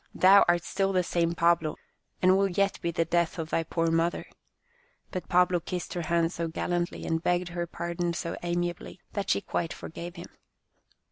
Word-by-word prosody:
" - - -42
Thou 195 +2 +9
art 175 -1 +3
still 195 +1 0
the 185 -1 +3
same 170 -1 0
Pablo, 170 -2 +2 0.5
and 185 +1 +6
will 195 +1 +3
yet 195 +2 0
be 170 - -1
the 165 0 0
death 170 +1 +1
of 160 -1 -4
thy - - +2
poor 165 0 -1
mother," 165 +1 +1 0.9
but 185 - -5
Pablo 180 0 +4
kissed 175 +1 -5
her 175 - -2
hand 165 0 +1
so 170 -2 -3
gallantly, 175 +1 -2
and 160 0 0
begged 175 +1 0
her 175 0 -3
pardon 170 +1 -3
so 170 0 -3
amiably, 175 +1 -3
that 200 -1 -3
she - - +2
quite 170 -4 -2
forgave 170 +2 -8
him. 170 - -9
175 Hz, 190 wpm, -28 LUFS, 170-180 Hz, 0.9 s, Thou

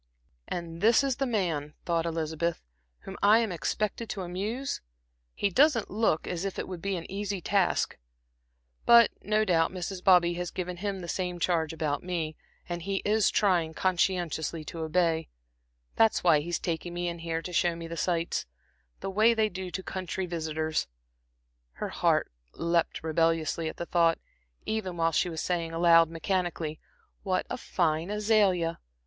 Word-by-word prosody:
"And 170 -1 -5
this 225 +5 +5
is 270 -3 0
the 275 - 0
man," 165 -10 -1
thought 170 -1 0
Elizabeth, 165 0 -2 0.4
"whom 195 - -8
I 210 +2 +7
am 230 -3 +1
expected 215 +6 -2
to 195 - -3
amuse. 210 +10 -3 0.5
He 200 - 0
doesn't 270 - +3
look 205 -6 +1
as 175 0 -3
if 195 -1 -3
it - - -3
would 180 -3 -6
be 195 +1 -1
an 170 - -5
easy 200 0 -3
task. 195 +1 +1 0.9
But 235 -1 +8
no 215 +1 +1
doubt 165 -4 +2
Mrs. 185 0 -5
Bobby 175 -2 +5
has 175 0 -3
given 180 -1 -4
him 195 0 -3
the 175 - -7
same 180 -1 -2
charge 165 -3 +1
about 150 -3 -2
me, 165 -4 -3 0.3
and 175 -1 -4
he 195 +2 -2
is 215 0 +3
trying, 175 -6 +2
conscientiously, 170 -4 0
to 165 - -7
obey. 160 0 +1 0.7
That's 225 -1 +4
why 165 -4 +5
he's 170 +3 -2
taken 170 +1 -3
me 175 0 -2
in 170 0 -4
here 165 0 -3
to 180 - -6
show 175 0 +2
me 165 0 -7
the 170 - -6
sights, 170 - -1 0.5
the - - -3
way 220 +4 +4
they 220 -1 +2
do 185 -1 -5
to 190 +1 -5
the - - -32
country 185 0 -3
visitors." 160 -2 -2 0.9
Her - - -4
heart - - +1 0.2
leaped 170 -1 0
rebelliously 165 0 +1
at - - -9
the 170 - -4
thought, 170 -1 +3 0.5
even 200 -5 -2
while 165 0 +2
she 170 +3 +1
was 160 -2 -4
saying 170 -2 -2
aloud 165 -1 +5
mechanically: 165 -2 -2 0.4
"'What 185 -2 0
a - - -2
fine 165 0 0
azalea!' 205 -5 +2
175 Hz, 170 wpm, -28 LUFS, 165-195 Hz, 0.9 s, But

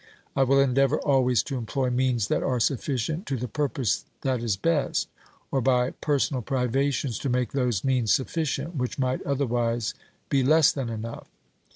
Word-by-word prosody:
I 135 - +2
will 135 +1 +4
endeavour 135 +2 +3
always 125 -6 +2
to 135 -3 -4
employ 125 +2 -1
means 125 -4 +1
that - - +1
are 125 -2 0
sufficient 140 - -1
to 135 - -1
the 125 +2 -3
purpose 135 -2 -1 0.2
that 130 -3 0
is 110 -5 0
best, 155 +5 0 0.4
or, 135 - +1
by 125 0 +2
personal 140 -3 0
privations, 130 +1 0
to 140 - -2
make 125 -2 0
those 125 -8 0
means 125 -5 +1
sufficient 155 +3 -1
which 125 -3 -2
might 130 -1 0
otherwise 120 -4 0 0.3
be 140 - +2
less 155 +3 +5
than 135 -4 -4
enough. 115 +1 -6
130 Hz, 165 wpm, -26 LUFS, 120-140 Hz, 0.4 s, less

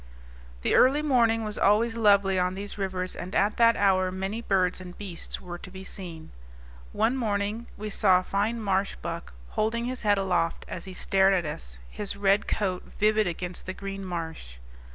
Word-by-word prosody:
The - - +2
early 280 +4 +5
morning 230 -6 +3
was 210 -1 -3
always 225 +3 +3
lovely 200 -4 +4
on 180 +1 0
these 200 +1 -6
rivers, 185 -2 -3
and 180 +2 -6
at 205 +2 +2
that 230 0 +5
hour 185 -2 +3
many 195 +4 -3
birds 185 -4 +1
and 180 -1 -10
beasts 190 -5 -5
were 175 -1 -8
to - - -10
be 190 0 -9
seen. 175 -4 -8 0.6
One 235 - +1
morning 215 -1 -1
we 215 0 -5
saw 190 -3 +4
a 185 - -1
fine 210 +5 -1
marsh 195 -2 0
buck, 170 - -6 0.2
holding 230 +2 -1
his 255 +1 -3
head 205 -2 +3
aloft 180 -4 0
as 170 - -6
he 190 - -8
stared 195 +1 +3
at 175 -3 0
us, - - -7
his 200 - -4
red 200 +1 +2
coat 185 -3 -2
vivid 215 0 +3
against 175 +1 -5
the 185 - -3
green 195 0 -6
marsh. 160 - -6
195 Hz, 185 wpm, -27 LUFS, 185-215 Hz, 0.6 s, early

